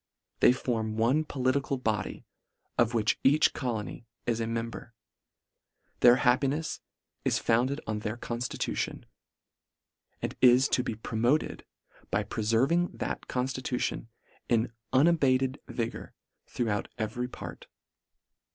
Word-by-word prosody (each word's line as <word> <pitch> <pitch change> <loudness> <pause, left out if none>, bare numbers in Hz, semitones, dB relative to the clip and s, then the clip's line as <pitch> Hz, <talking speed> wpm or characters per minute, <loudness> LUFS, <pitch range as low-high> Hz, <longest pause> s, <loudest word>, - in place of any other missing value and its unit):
They - - +7
form 110 -4 -2
one 125 +8 +3
poli 130 -3 +1
tical 135 -1 -2
body, 105 -3 -2 0.5
of 120 0 +2
which 110 -2 +2
each 145 +3 +5
colony 115 -3 -4 0.2
is 115 -1 0
a 115 - -1
mem 115 0 -2
ber. 115 0 -10 1.0
Their 120 0 +8
happinefs 135 +5 +1 0.4
is - - +2
founded 130 +5 +1
on 110 -1 -2
their 110 +2 -4
conftitution; 120 0 -3 1.2
and - - -4
is 125 +2 +7
to - - +2
be 120 -3 -3
promoted 120 +6 0 0.4
by - - +1
preferving 130 +11 +1
that - - -4
conftitution 130 -2 -2 0.4
in 115 0 +2 0.2
unabated 135 -2 +3
vi 115 -2 -2
gour - - -10 0.3
throughout 110 -4 -1
every 120 +2 -2
part. - - -9
125 Hz, 120 wpm, -29 LUFS, 115-130 Hz, 1.2 s, Their